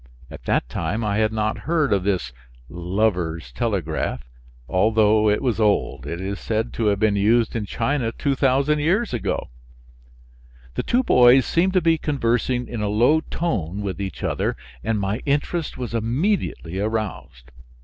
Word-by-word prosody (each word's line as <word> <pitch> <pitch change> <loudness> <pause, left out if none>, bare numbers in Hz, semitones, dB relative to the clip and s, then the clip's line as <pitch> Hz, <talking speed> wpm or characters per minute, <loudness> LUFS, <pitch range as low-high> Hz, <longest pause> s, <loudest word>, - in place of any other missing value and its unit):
At - - -11
that - - +1
time 85 - -2
I 105 -1 0
had 110 0 +2
not 110 0 -1
heard 155 -8 +2
of 95 -2 +1
this 90 -11 -1 0.4
"lovers' 90 - -1
telegraph," 100 - -2 0.4
although 110 +2 +3
it 105 - +1
was 120 -4 0
old. 105 -2 +1
It 85 - -4
is 100 +2 -4
said 110 +1 -2
to 115 - -1
have 100 -1 +2
been 105 0 +2
used 110 +4 +2
in 105 -3 -2
China 120 +1 -1
2000 140 +3 +1
years 185 - +1
ago. 115 - -2 1.2
The - - -1
two 250 +2 +1
boys 125 - +6
seemed 185 +3 +1
to 185 - +3
be 165 -1 +2
conversing 125 -3 0
in 115 -3 -5
a 105 - 0
low 120 +9 +4
tone 105 - -3
with 100 0 -4
each 95 -5 -5
other - - -1 0.3
and 110 -2 0
my 100 +3 -1
interest 150 +3 -1
was 125 -2 -5
immediately 115 - -1
aroused. 100 - -4
110 Hz, 160 wpm, -22 LUFS, 100-130 Hz, 1.2 s, boys